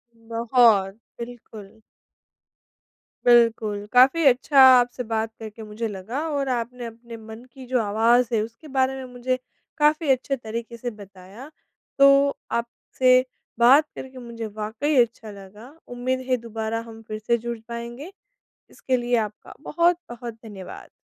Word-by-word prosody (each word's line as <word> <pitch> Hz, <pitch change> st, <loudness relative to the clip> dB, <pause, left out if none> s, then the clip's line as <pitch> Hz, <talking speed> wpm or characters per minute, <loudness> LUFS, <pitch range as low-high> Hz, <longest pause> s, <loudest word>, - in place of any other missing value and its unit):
बहुत, 230 Hz, -3 st, +2 dB, 0.3 s
बिल्कुल। 225 Hz, -3 st, -10 dB, 1.5 s
बिल्कुल, 225 Hz, -4 st, +3 dB
काफ़ी 265 Hz, +7 st, +5 dB
अच्छा 270 Hz, +2 st, +4 dB, 0.2 s
आपसे 245 Hz, +1 st, -2 dB
बात 225 Hz, -1 st, -2 dB
करके 220 Hz, 0 st, -9 dB
मुझे 215 Hz, +2 st, -5 dB
लगा 210 Hz, +5 st, -5 dB
और 280 Hz, -3 st, -2 dB
आपने 245 Hz, 0 st, -3 dB
अपने 230 Hz, 0 st, -10 dB
मन 220 Hz, +1 st, -11 dB
की 265 Hz, -1 st, -11 dB
जो 255 Hz, 0 st, +1 dB
आवाज़ 225 Hz, +4 st, +3 dB
है 220 Hz, -, +2 dB
उसके 230 Hz, +8 st, -9 dB
बारे 260 Hz, 0 st, +2 dB
में 265 Hz, -1 st, -7 dB
मुझे 255 Hz, +1 st, -1 dB, 0.4 s
काफ़ी 305 Hz, 0 st, +2 dB
अच्छे 265 Hz, +1 st, 0 dB
तरीके 235 Hz, -1 st, -7 dB
से 245 Hz, +1 st, -4 dB
बताया। 200 Hz, +4 st, -13 dB, 0.5 s
तो 275 Hz, 0 st, +5 dB, 0.2 s
आपसे 255 Hz, +2 st, +1 dB, 0.4 s
बात 265 Hz, +6 st, +6 dB
करके 265 Hz, 0 st, -9 dB
मुझे 235 Hz, -2 st, -7 dB
वाक़ई 220 Hz, +8 st, -3 dB
अच्छा 225 Hz, -2 st, -9 dB
लगा 205 Hz, +4 st, -13 dB, 0.3 s
उम्मीद 255 Hz, +1 st, -1 dB
है 255 Hz, -, +3 dB
दोबारा 225 Hz, 0 st, -3 dB
हम 225 Hz, 0 st, -11 dB
फिर 215 Hz, 0 st, -5 dB
से 235 Hz, +2 st, +1 dB
जुड़ 235 Hz, +1 st, -5 dB
पाएँगे, 235 Hz, +7 st, -7 dB, 0.6 s
इसके 260 Hz, -1 st, -2 dB
लिए 240 Hz, 0 st, 0 dB
आपका 210 Hz, -, -15 dB
बहुत-बहुत 305 Hz, -8 st, -1 dB
धन्यवाद। 200 Hz, -4 st, -10 dB
235 Hz, 135 wpm, -23 LUFS, 220-255 Hz, 1.5 s, बात